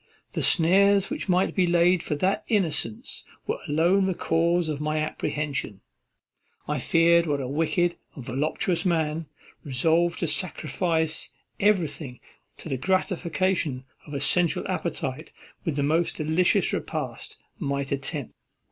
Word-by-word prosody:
The - - -2
snares 195 +5 +4
which 295 -9 -4
might 185 +1 +2
be 185 -2 +2
laid 175 +1 +4
for 150 - -2
that 185 +7 0
innocence 165 - 0 0.2
were - - -2
alone 175 +6 +3
the 190 - -1
cause 170 +1 +1
of 150 -2 -3
my 155 +1 -1
apprehension. 145 -8 -2 0.9
I - - -1
feared 170 0 +4
what 145 -2 0
a 130 - -3
wicked 165 +5 0 0.2
and 130 - -9
voluptuous 150 +7 -1
man, 160 -3 0 0.4
resolved 165 +6 +1
to 170 - +1
sacrifice 160 -2 -1 0.3
everything 160 - 0 0.4
to - - -9
the 135 - -2
gratification 170 -3 0 0.2
of 145 - -7
a - - -1
sensual 175 +3 +2
appetite - - -3 0.3
with 160 - -1
the 145 - 0
most 160 +4 +1
delicious 160 +3 +2
repast, - - -4 0.2
might 140 -4 -2
attempt. 140 0 -3
165 Hz, 135 wpm, -26 LUFS, 145-180 Hz, 0.9 s, snares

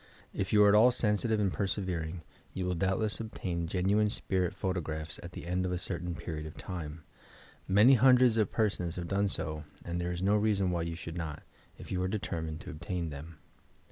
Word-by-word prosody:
If 95 - -2
you 105 -1 +6
are 105 - +7
at - - +5
all 115 +4 +7
sensi 110 -2 +1
tive 110 -1 +2
and 100 -4 +1
persevering, 90 -2 -2 0.3
you 95 - -2
will 90 - 0
doubtless 95 +4 0
obtain 90 -7 -3
genuine 100 +4 +2
spirit 95 -3 -1
photographs 80 -4 -3
at 85 - -9
the - - -7
end 90 +1 0
of 90 - -1
a 90 - 0
certain 90 -1 -4
period 80 -3 -5
of 75 - -11
time. 80 -4 -6 0.6
Many 105 +7 +7
hundreds 125 -1 +6
of 110 -3 +2
p»?r8ons 95 -6 0
have 85 -1 -4
done 100 +3 +1
so 75 -5 -3 0.2
and 85 0 -2
there 90 0 -1
is 90 +1 -3
no 100 +2 +4
reason 105 -3 +2
why 85 -1 0
you 85 0 -3
should 85 0 -7
not, 80 -3 -5 0.3
if - - -10
you 90 -1 0
are 95 - +1
determined 80 -5 -3
to - - -7
obtain 85 0 -4
them. 75 +3 -9
90 Hz, 205 wpm, -31 LUFS, 85-105 Hz, 0.6 s, are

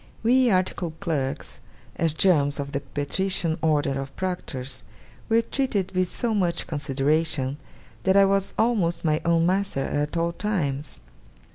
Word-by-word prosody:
We 250 +2 +4
articled 180 -4 0
clerks, 150 -8 -3 0.4
as 165 -1 +1
germs 150 -5 +3
of 140 0 -4
the 140 - -1
patrician 165 +4 -2
order 145 -3 +1
of 135 0 -8
proctors, 135 -8 -4 0.5
were 225 +1 +4
treated 225 -7 -1
with 185 -1 +1
so 235 -3 -1
much 175 -5 0
consideration, 145 -1 0 0.4
that 190 +1 +3
I 200 - +7
was 195 0 +1
almost 200 -8 +1
my 155 0 +2
own 165 0 +3
master 185 -6 +1
at 145 +3 -1
all 170 0 +1
times. 150 - -2
165 Hz, 140 wpm, -25 LUFS, 145-195 Hz, 0.5 s, I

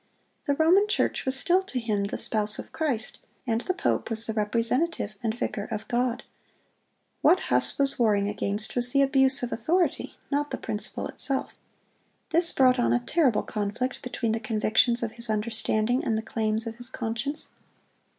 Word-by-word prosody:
The 285 - +2
Roman 355 +7 +4
Church 420 - 0
was 260 0 0
still 365 0 +3
to 265 -9 -3
him 210 -4 -1
the 200 - -4
spouse 210 -1 0
of - - -8
Christ, 270 -9 -2 0.3
and 230 -2 0
the 370 - -1
pope - - -1
was 225 0 0
the 220 - -3
representative 230 +4 0
and 225 0 -2
vicar 205 -3 -3
of 220 -1 -6
God. 245 0 -1 1.0
What 370 - +5
Huss - - +2
was 275 -2 +1
warring 205 -4 +2
against 205 +1 0
was 245 0 +4
the 275 0 +5
abuse 270 -1 +4
of 245 - -2
authority, 340 +10 0 0.2
not 290 +1 0
the - - -4
principle - - -4
itself. 270 -1 -1 0.8
This 335 +1 +3
brought 255 -1 +4
on 240 - +2
a 245 - +3
terrible 255 -2 +1
conflict 215 +5 -3
between 240 -2 -2
the 225 - -1
convictions 225 +2 +2
of 225 - -2
his 235 0 -3
understanding 220 +2 0
and 220 - 0
the 220 - -3
claims 220 0 -2
of 230 0 -6
his 245 0 -5
conscience. 240 +5 -4
240 Hz, 175 wpm, -26 LUFS, 220-270 Hz, 1.0 s, What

